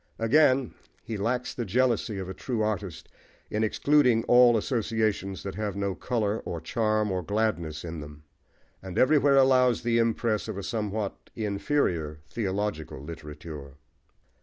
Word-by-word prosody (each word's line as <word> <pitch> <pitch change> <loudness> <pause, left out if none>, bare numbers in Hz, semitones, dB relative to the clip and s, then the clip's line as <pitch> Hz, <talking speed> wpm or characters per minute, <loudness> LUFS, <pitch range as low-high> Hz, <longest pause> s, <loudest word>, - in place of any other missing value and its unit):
Again, 130 +1 +3 0.3
he 115 - -5
lacks 120 +5 -1
the 120 - -3
jealousy 115 0 +1
of 95 -1 -5
a 95 - -5
true 110 +3 -2
artist 100 -5 -3 0.4
in 105 +1 0
excluding 125 0 +3
all 120 -1 +6
associations 110 -4 -1
that 100 - -5
have 105 0 -3
no 100 -1 -1
colour, 110 -1 -1
or 85 -2 -5
charm, 110 +4 0
or 90 -1 -1
gladness 85 -6 -1
in 85 -1 -5
them; 75 0 -11 0.6
and 95 -1 -7
everywhere 140 0 +5
allows 130 -3 +4
the 115 0 +2
impress 115 -1 0
of 110 -3 -5
a 100 - -4
somewhat 105 -1 -3
inferior 100 - -1
theological 100 - -3
literature. 75 -1 -9
105 Hz, 140 wpm, -27 LUFS, 95-120 Hz, 0.6 s, all